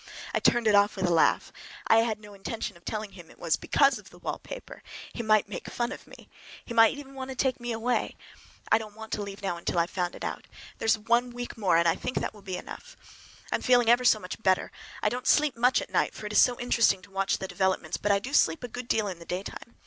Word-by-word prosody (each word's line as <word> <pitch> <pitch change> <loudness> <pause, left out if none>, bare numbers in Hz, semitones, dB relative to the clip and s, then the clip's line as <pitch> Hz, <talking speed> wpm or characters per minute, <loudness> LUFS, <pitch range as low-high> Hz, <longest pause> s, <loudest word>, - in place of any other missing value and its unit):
I - - +2
turned 240 -1 +3
it 215 - +4
off 205 0 +4
with 190 -2 -1
a 175 - +2
laugh. 165 - +2 0.3
I 225 - +5
had 225 -1 +1
no 210 -1 -13
intention 200 +2 -5
of 170 - -19
telling 215 0 -4
him 175 -4 -13
it - - -17
was 165 -2 +1
because 275 -5 +2
of 210 - -15
the 175 - -16
wallpaper—he 245 - -8
would 215 -2 +3
make 200 -3 -7
fun 240 0 -2
of - - -9
me. - - -14 0.4
He 235 - -6
might 225 +3 +5
even 275 -1 -10
want 265 -1 -6
to 265 - -5
take 255 0 0
me 240 0 -4
away. 230 +2 -1 0.6
I 220 - +6
don't 215 -2 -9
want 220 0 -10
to - - -1
leave 200 0 -7
now 185 -3 -1
until 170 +1 -3
I - - +5
have 170 - -8
found 180 -2 -2
it - - -9
out. - - -5 0.3
There - - -3
is 225 - +5
a - - -17 0.2
week 245 0 -7
more, 190 -6 +2
and 170 0 +3
I 165 - +4
think 250 - -4
that - - -3
will 210 - -15
be 190 -2 -5
enough. - - -10 0.5
I'm - - 0
feeling 245 -2 +4
ever 245 +1 +4
so 240 - +5
much 185 +1 -8
better! 190 -3 +2 0.3
I 210 - +4
don't 250 +3 -4
sleep 300 -4 +4
much 245 +2 +3
at - - -13
night, - - +1
for - - -8
it 210 - -4
is - - +7
so 245 -1 +3
interesting 230 -6 +2
to 195 - -16
watch 195 0 0
developments; 190 0 -1
but 205 - 0
I 200 - +4
sleep 165 - +3
a - - -3
good 245 +1 -7
deal 215 -3 +1
in 185 -3 -5
the 170 - -11
daytime. 190 +6 -6
215 Hz, 260 wpm, -28 LUFS, 190-240 Hz, 0.6 s, is